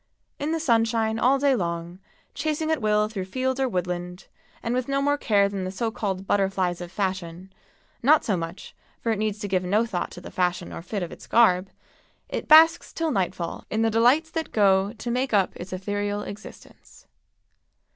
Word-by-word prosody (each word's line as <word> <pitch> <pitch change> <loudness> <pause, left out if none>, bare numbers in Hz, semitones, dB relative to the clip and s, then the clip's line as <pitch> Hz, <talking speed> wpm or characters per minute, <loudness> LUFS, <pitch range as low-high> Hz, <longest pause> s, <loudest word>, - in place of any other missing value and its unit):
In 290 +2 -2
the 325 - 0
sunshine 225 -5 +1
all 260 +4 +4
day 275 -1 +3
long, 170 -2 -4 0.3
chasing 310 0 -1
at 315 -5 0
will 210 0 +2
through 200 -4 -5
field 260 +6 -2
or 265 -1 +1
woodland, 180 -2 -4 0.4
and 230 - -1
with 255 0 -1
no 275 0 0
more 285 +1 +2
care 205 -8 +2
than 200 -1 -4
the 185 - -3
so 225 +4 -2
called 195 -4 -3
"butterflies 190 -3 0
of 175 0 -7
fashion" 185 -1 -4 0.5
(not 295 +5 +4
as 205 - +2
much, 170 +3 -6 0.2
for 230 - -1
it 220 - -1
needs 215 -1 -1
to 210 -1 -5
give 185 -2 0
no 205 +5 +2
thought 190 -6 -3
to - - -10
the 175 - -10
fashion 180 -1 -1
or - - -6
fit 195 +2 -4
of 175 - -6
its - - -12
garb), 190 -5 +4 0.6
it - - -4
basks 325 +2 +6
till 325 -1 -1
nightfall 180 -4 -2
in 220 +1 0
the 225 - +2
delights 255 +9 +3
that 325 -1 -3
go 195 -1 +3
to 235 +1 -5
make 250 -1 0
up 195 -2 +2
its 180 +2 -8
ethereal 205 +2 -2
existence. 205 +1 -12
205 Hz, 195 wpm, -25 LUFS, 185-245 Hz, 0.6 s, basks